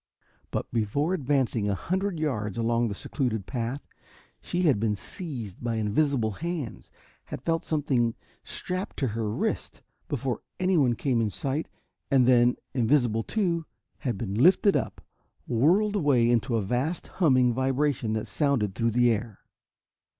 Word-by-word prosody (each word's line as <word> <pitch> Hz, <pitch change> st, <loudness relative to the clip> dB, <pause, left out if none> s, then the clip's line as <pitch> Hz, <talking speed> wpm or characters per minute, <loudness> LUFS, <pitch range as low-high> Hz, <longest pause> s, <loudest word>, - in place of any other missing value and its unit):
But -, -, -2 dB
before 120 Hz, -, 0 dB
advancing 130 Hz, -, +1 dB
a 100 Hz, -, +1 dB
hundred 185 Hz, -, -2 dB
yards 110 Hz, -10 st, -2 dB
along 115 Hz, +1 st, +1 dB
the 100 Hz, -, -4 dB
secluded 110 Hz, -4 st, -2 dB
path, 120 Hz, +5 st, -3 dB, 0.6 s
she 180 Hz, +1 st, -2 dB
had 140 Hz, -, +4 dB
been 105 Hz, -1 st, +1 dB
seized 120 Hz, -, -7 dB
by 120 Hz, -1 st, -1 dB
invisible 110 Hz, +2 st, +1 dB
hands 155 Hz, -, -5 dB, 0.4 s
had -, -, -7 dB
felt 165 Hz, -1 st, 0 dB
something 130 Hz, -7 st, +1 dB, 0.3 s
strapped 185 Hz, +2 st, -5 dB
to 135 Hz, -, 0 dB
her 110 Hz, 0 st, -2 dB
wrist, 105 Hz, -, -3 dB, 0.2 s
before -, -, -2 dB, 0.2 s
anyone 165 Hz, -10 st, +3 dB
came 125 Hz, -2 st, +1 dB
in 110 Hz, -, +1 dB
sight 135 Hz, -, -3 dB, 0.4 s
and 135 Hz, -3 st, +4 dB
then, 120 Hz, -1 st, +5 dB, 0.2 s
invisible 120 Hz, -3 st, +2 dB
too, 170 Hz, -, -1 dB, 0.3 s
had 120 Hz, -6 st, -2 dB
been 100 Hz, -2 st, -4 dB
lifted 180 Hz, -, +5 dB
up, -, -, -2 dB, 0.5 s
whirled 180 Hz, -, +3 dB
away 140 Hz, -, +3 dB
into 120 Hz, 0 st, +2 dB
a 110 Hz, -, +1 dB
vast, 125 Hz, -, -1 dB, 0.2 s
humming 130 Hz, -6 st, +4 dB
vibration 130 Hz, -2 st, 0 dB
that 110 Hz, -, -2 dB
sounded 135 Hz, -10 st, 0 dB
through 115 Hz, +3 st, +1 dB
the 120 Hz, +1 st, +4 dB
air. 110 Hz, -1 st, -3 dB
125 Hz, 145 wpm, -27 LUFS, 115-150 Hz, 0.6 s, then